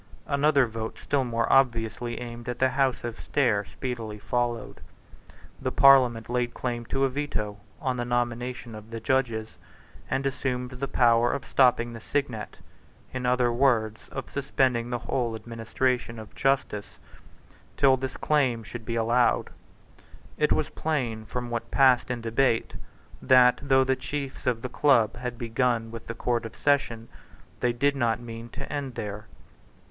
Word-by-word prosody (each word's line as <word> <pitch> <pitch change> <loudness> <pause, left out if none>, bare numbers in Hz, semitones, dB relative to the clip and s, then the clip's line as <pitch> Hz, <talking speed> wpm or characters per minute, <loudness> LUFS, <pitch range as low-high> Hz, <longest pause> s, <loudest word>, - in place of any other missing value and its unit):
Another 140 -1 +3
vote 110 -1 -5
still 140 -2 0
more 115 -2 0
obviously 120 -2 +1
aimed 120 0 -7
at 125 - -3
the 130 - +3
House 130 0 0
of 120 -1 -4
Stair 120 -8 +1
speedily 115 -1 -5
followed. 120 0 -2 0.8
The - - -1
Parliament 130 -5 +5
laid 120 0 -1
claim 120 -2 -3
to 135 +3 -1
a - - +3
Veto 125 -7 -3 0.2
on 130 -6 -1
the 120 - -1
nomination 120 0 -2
of 110 0 -10
the 115 0 -5
judges, 115 -3 -1 0.5
and 135 +1 -1
assumed 130 -2 -2
the 130 +2 -4
power 120 -2 +4
of 140 - -4
stopping 120 -3 +3
the 115 - -9
signet, 120 - -3 0.6
in 130 -1 -2
other 125 -1 +2
words, 115 -4 +1
of 135 - -5
suspending 130 -4 0
the 120 - -1
whole 120 -1 -2
administration 115 +2 -2
of 110 -2 -10
justice, 135 -7 -1 0.8
till 135 -2 +5
this 130 0 -5
claim 130 -7 +1
should 115 +1 -8
be 115 - -3
allowed. 115 +2 +2 0.8
It - - +1
was - - +1
plain 120 -9 -2
from 120 +1 -5
what 120 -1 -3
passed 130 -3 +4
in 120 -1 -3
debate 115 +1 +1 0.5
that, 125 -1 +6
though 135 -1 +4
the 130 0 +1
chiefs 135 +1 -5
of 115 -2 0
the - - -1
Club 120 -7 +4
had 125 -1 -5
begun 115 -1 0
with 115 -1 -9
the 115 - -5
Court 120 0 0
of - - -14
Session, 120 -6 +1 0.5
they 125 - +2
did 140 +4 +1
not 115 -4 +1
mean 115 0 -8
to - - -7
end 140 -4 -4
there. 105 +1 -5
120 Hz, 160 wpm, -27 LUFS, 115-130 Hz, 0.8 s, that